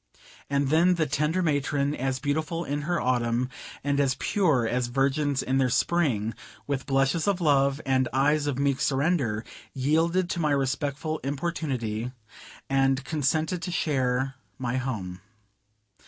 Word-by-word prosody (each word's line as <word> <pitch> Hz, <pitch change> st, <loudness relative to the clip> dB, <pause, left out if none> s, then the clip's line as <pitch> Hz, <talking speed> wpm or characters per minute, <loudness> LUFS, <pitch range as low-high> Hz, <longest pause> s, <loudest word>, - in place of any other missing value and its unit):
And 140 Hz, -1 st, +1 dB
then 170 Hz, +4 st, +4 dB
the 165 Hz, -2 st, +1 dB
tender 150 Hz, +5 st, 0 dB
matron, 145 Hz, -2 st, +1 dB
as 135 Hz, -2 st, -1 dB
beautiful 155 Hz, +4 st, -2 dB
in 145 Hz, +1 st, -2 dB
her 175 Hz, -1 st, +1 dB
Autumn, 125 Hz, 0 st, 0 dB, 0.3 s
and 140 Hz, 0 st, +1 dB
as 135 Hz, -2 st, +2 dB
pure 155 Hz, -, +2 dB
as 125 Hz, +1 st, 0 dB
virgins 135 Hz, +2 st, +1 dB
in 135 Hz, +1 st, +1 dB
their 130 Hz, -1 st, +3 dB
spring, 125 Hz, -8 st, +1 dB, 0.3 s
with 140 Hz, -1 st, -3 dB
blushes 135 Hz, +5 st, +1 dB
of 200 Hz, -2 st, +2 dB
love 140 Hz, -3 st, +3 dB
and 130 Hz, -1 st, +2 dB
"eyes 145 Hz, +3 st, +2 dB
of 140 Hz, -3 st, -1 dB
meek 140 Hz, -1 st, +1 dB
surrender," 135 Hz, -6 st, +1 dB, 0.3 s
yielded 165 Hz, +7 st, +2 dB
to -, -, -2 dB
my 155 Hz, -2 st, +1 dB
respectful 140 Hz, +3 st, -1 dB
importunity, 135 Hz, -6 st, -3 dB, 0.6 s
and 135 Hz, -1 st, +2 dB
consented 155 Hz, +3 st, 0 dB
to 180 Hz, -, -4 dB
share 135 Hz, -5 st, 0 dB, 0.2 s
my 125 Hz, -1 st, -2 dB
home. 100 Hz, -9 st, -4 dB
140 Hz, 140 wpm, -27 LUFS, 130-155 Hz, 0.6 s, then